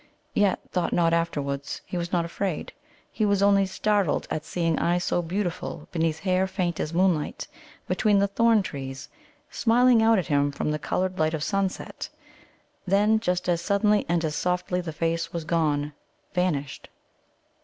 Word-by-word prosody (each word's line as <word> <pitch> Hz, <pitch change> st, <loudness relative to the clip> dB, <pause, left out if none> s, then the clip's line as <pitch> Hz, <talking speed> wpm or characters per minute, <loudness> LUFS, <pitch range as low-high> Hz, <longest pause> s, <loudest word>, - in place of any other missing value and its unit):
Yet, 205 Hz, -2 st, +2 dB
thought 180 Hz, -2 st, 0 dB
Nod 165 Hz, -1 st, +3 dB
afterwards, 145 Hz, -4 st, -2 dB
he -, -, -7 dB
was 175 Hz, -1 st, -3 dB
not 170 Hz, -2 st, +1 dB
afraid. 175 Hz, 0 st, -3 dB, 0.4 s
He 220 Hz, -, -2 dB
was 200 Hz, -1 st, +2 dB
only 200 Hz, -1 st, +4 dB
startled 200 Hz, -2 st, 0 dB
at 155 Hz, -, -2 dB
seeing 165 Hz, -2 st, -1 dB
eyes 175 Hz, +1 st, +1 dB
so 175 Hz, -, +1 dB
beautiful 175 Hz, +1 st, -4 dB
beneath 165 Hz, -2 st, -1 dB
hair 185 Hz, 0 st, +1 dB
faint 180 Hz, -3 st, -2 dB
as 155 Hz, -, -2 dB
moonlight, 175 Hz, -3 st, 0 dB, 0.4 s
between 210 Hz, -2 st, +2 dB
the 200 Hz, -, +4 dB
thorn 225 Hz, +1 st, +3 dB
trees, 135 Hz, -5 st, -6 dB, 0.4 s
smiling 240 Hz, 0 st, +4 dB
out 225 Hz, 0 st, +5 dB
at 185 Hz, -, 0 dB
him 145 Hz, -1 st, +1 dB
from 140 Hz, +2 st, -2 dB
the 150 Hz, -, -2 dB
coloured 185 Hz, +4 st, -2 dB
light 155 Hz, +1 st, +2 dB
of 150 Hz, -, -3 dB
sunset. 195 Hz, 0 st, -2 dB, 0.8 s
Then, 210 Hz, +3 st, +3 dB
just 180 Hz, -5 st, -1 dB
as 170 Hz, -1 st, +1 dB
suddenly 205 Hz, +3 st, +2 dB
and 170 Hz, -1 st, +1 dB
as 150 Hz, -1 st, -2 dB
softly, 180 Hz, +2 st, -1 dB
the 170 Hz, -2 st, -5 dB
face 165 Hz, +1 st, -1 dB
was 170 Hz, -1 st, -4 dB
gone, 150 Hz, -3 st, 0 dB, 0.4 s
vanished. 155 Hz, -7 st, -2 dB
175 Hz, 165 wpm, -26 LUFS, 160-195 Hz, 0.8 s, out